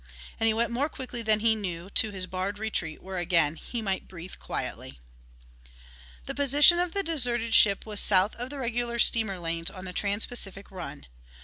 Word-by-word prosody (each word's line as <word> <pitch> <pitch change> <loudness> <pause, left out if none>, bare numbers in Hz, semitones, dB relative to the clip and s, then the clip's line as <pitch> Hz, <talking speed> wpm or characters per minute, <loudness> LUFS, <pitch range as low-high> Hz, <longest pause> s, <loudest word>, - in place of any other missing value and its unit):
And 225 - +2
he 220 - +3
went 235 +1 +2
more 270 +6 -1
quickly 250 -4 -6
than 215 -1 +1
he 225 0 +3
knew 180 -5 -5
to 220 - +5
his 190 -2 -5
barred 190 +2 -4
retreat 205 -7 -4
where 190 -1 -5
again 170 -4 +2
he 230 +7 -6
might 195 -2 -2
breathe 180 0 -10
quietly. 65 - -6 1.3
The - - -5
position 285 +5 +6
of 355 -1 -1
the 395 - -1
deserted 240 -9 -1
ship 200 -2 +6
was 210 -2 -1
south 195 +1 +3
of 245 +2 -5
the 285 - -7
regular 240 -2 -2
steamer 220 -4 +3
lanes 165 -1 -3
on 185 0 -10
the 180 - -5
TransPacific 200 -1 -2
run. 165 - -8
210 Hz, 185 wpm, -27 LUFS, 185-240 Hz, 1.3 s, position